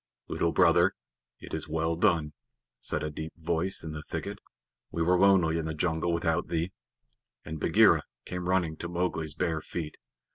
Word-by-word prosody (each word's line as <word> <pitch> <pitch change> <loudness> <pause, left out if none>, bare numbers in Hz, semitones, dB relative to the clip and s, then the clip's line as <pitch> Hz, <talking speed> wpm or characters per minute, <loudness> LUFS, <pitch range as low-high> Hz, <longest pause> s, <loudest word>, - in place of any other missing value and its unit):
"Little 85 - 0
Brother, 85 +2 +5 0.5
it - - -10
is - - -4
well 80 +1 0
done," 85 -5 +2 0.5
said - - -2
a 75 - -2
deep 80 +2 -6
voice 85 +3 -1
in 80 - -5
the 75 -1 -5
thicket. - - -5 0.5
"We 85 - -1
were 90 +2 +4
lonely 90 -4 +5
in 80 - -3
the 80 -1 -3
jungle 80 +1 0
without 80 -1 0
thee," 85 +2 -1 0.7
and 80 0 -5
Bagheera - - +5 0.2
came 90 0 -4
running 85 -4 +1
to 85 - -5
Mowgli's 85 -3 -2
bare 85 -2 0
feet. 80 -1 -5
85 Hz, 170 wpm, -29 LUFS, 80-90 Hz, 0.7 s, Brother